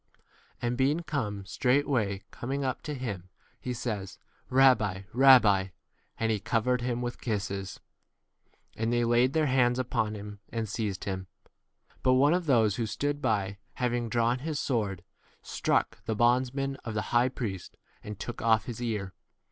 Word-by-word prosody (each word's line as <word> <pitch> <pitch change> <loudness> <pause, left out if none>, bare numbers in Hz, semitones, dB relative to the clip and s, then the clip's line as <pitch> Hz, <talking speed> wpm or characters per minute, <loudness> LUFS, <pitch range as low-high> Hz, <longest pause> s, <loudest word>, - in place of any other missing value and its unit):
And 120 0 -1
being 145 +5 +2
come, 115 - -3
straightway 125 -5 +1
coming 135 +3 -3
up 130 -1 -2
to 150 - -5
him, 100 -9 -5 0.3
he 125 - -4
says, 105 -5 -4 0.3
Rabbi, 125 -8 +4
Rabbi; 125 -6 +7 0.6
and 115 0 0
46 - - +3
he 105 - -1
covered 115 +3 0
him 120 0 -2
with 120 0 -5
kisses.? 100 -4 -3 1.0
And 115 +1 -1
they 120 0 +2
laid 120 +3 +3
their 160 -1 +2
hands 125 -3 +3
upon 110 -4 -1
him, 105 0 -8
4 - - -47
7 - - -4
and 110 - -4
seized 105 -3 -3
him: 95 -1 -4 0.7
but 130 - +4
one 140 +5 +5
of 180 -2 -1
those 110 -7 +3
who 115 -2 -1
stood 145 +5 -2
by, 100 -5 0 0.2
having 120 -2 -1
drawn 120 +2 +1
his 150 +1 -3
sword, 100 -8 -1 0.4
struck - - -1
the 110 - -1
bondsman 130 +4 +1
of 115 -5 -7
the 105 - -3
high 120 +2 +4
priest, 105 -8 -5 0.3
and 105 -1 -7
took 120 - -6
off 110 -3 +3
his 120 -3 -6
48 120 -1 -1
ear. 100 -3 -4
120 Hz, 170 wpm, -29 LUFS, 105-130 Hz, 1.0 s, Rabbi